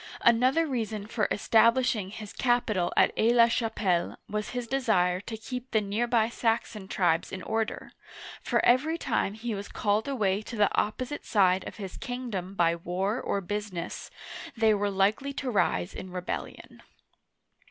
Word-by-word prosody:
Another 255 +7 +4
reason 220 -7 -3
for 215 0 -1
establishing 225 -1 +3
his 210 0 -8
capital 230 -8 +1
at - - +5
Aix 230 +2 +4
la 235 -1 +7
Chapelle 220 -7 0
was 210 0 -3
his 245 -1 -3
desire 220 -9 +1
to 220 +3 -7
keep 250 +3 -6
the 220 - +2
near 210 +3 -1
by 230 -2 +3
Saxon 225 -3 -1
tribes 175 -4 +1
in 185 - -6
order, 225 0 -2 0.5
for - - +1
every 290 +7 +3
time 220 - -1
he 225 +1 -4
was 200 0 -5
called 210 +3 0
away 210 -7 0
to 230 - -8
the 210 -2 +2
opposite 255 +6 -2
side 185 -3 +2
of - - -8
his 195 -4 -7
kingdom 225 -7 -5
by 170 -2 +3
war 185 +7 -2
or 200 - -1
business, 205 -2 -5 0.5
they 220 -1 +4
were 205 0 0
likely 205 +8 +1
to 270 -2 -3
rise 195 -3 +1
in 185 - -7
rebellion. 180 0 -6
215 Hz, 160 wpm, -28 LUFS, 195-240 Hz, 0.5 s, la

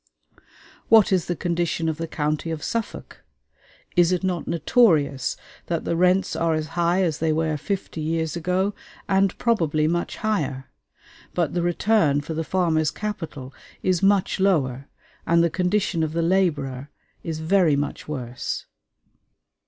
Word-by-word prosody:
What 220 -3 +6
is 185 -3 +1
the 175 - -1
condition 170 -1 -1
of 160 -1 -1
the 165 0 -4
county 155 +1 -2
of 160 -2 -4
Suffolk? 230 -2 -5 0.7
Is 175 -1 +4
it 180 0 0
not 180 -3 -2
notorious 155 - +2 0.3
that 170 -2 -2
the - - 0
rents 180 +2 +2
are 165 -1 +1
as 155 0 -3
high 175 +2 +1
as 160 -3 -1
they 160 0 +1
were 155 0 0
fifty 185 0 -4
years 160 0 -1
ago, 180 +4 0 0.3
and 195 -1 +2
probably 160 -10 +1
much 175 +1 -2
higher? 145 -12 -2 0.6
But 170 -5 0
the 175 - 0
return 175 -4 +2
for 160 +3 -6
the 160 +1 -2
farmer's 160 -3 +1
capital 165 -11 -6 0.3
is 185 -2 +1
much 195 -1 +2
lower, 140 -9 +1 0.4
and 170 0 +4
the 170 - +1
condition 180 0 0
of 160 -1 -1
the 165 0 0
laborer 150 -7 0 0.3
is 160 -2 -4
very 165 -1 +3
much 145 0 -3
worse. 125 -5 -4
165 Hz, 150 wpm, -23 LUFS, 155-185 Hz, 0.7 s, What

